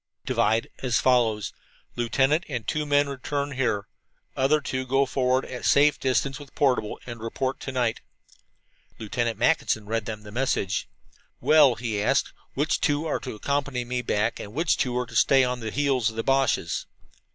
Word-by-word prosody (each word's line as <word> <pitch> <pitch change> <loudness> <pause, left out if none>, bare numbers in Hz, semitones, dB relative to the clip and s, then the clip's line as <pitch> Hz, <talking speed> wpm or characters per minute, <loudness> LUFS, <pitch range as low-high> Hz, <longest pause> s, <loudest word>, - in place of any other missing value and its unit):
"Divide 110 +2 +1
as 125 -3 +1
follows: 115 -6 +2 0.4
Lieutenant 135 +6 +2
and 125 -6 -4
two 150 -1 -1
men 145 0 +3
return 140 +1 -3
here; 125 -7 -1 0.5
other 135 +3 +3
two 130 -2 -3
go 135 +2 +2
forward 130 0 +1
at 125 -1 -7
safe 145 +1 +4
distance 135 +2 0
with 145 -1 -13
portable, 125 -6 +1
and 120 -1 -7
report 130 +4 -3
to 135 - -5
night." 125 -3 -1 1.0
Lieutenant 115 +1 -2
Mackinson 110 -7 +1
read 110 0 -2
them 110 -1 -5
the 105 - -11
message. 105 -5 -1 0.5
"Well," 150 -5 +5
he 110 -4 -3
asked, 105 - +1 0.2
"which 145 +3 0
two 145 +1 +1
are 155 - -1
to 130 - -6
accompany 140 +1 -2
me 125 +1 -2
back, 110 -1 0
and 105 +3 -8
which 160 +2 +2
two 125 -1 -1
are 125 - 0
to 115 -1 -12
stay 135 +3 +5
on 125 -1 -1
the 110 -2 -4
heels 130 -2 +1
of 110 - -10
the 115 - -2
Boches?" 135 -2 +1
125 Hz, 175 wpm, -25 LUFS, 115-140 Hz, 1.0 s, Well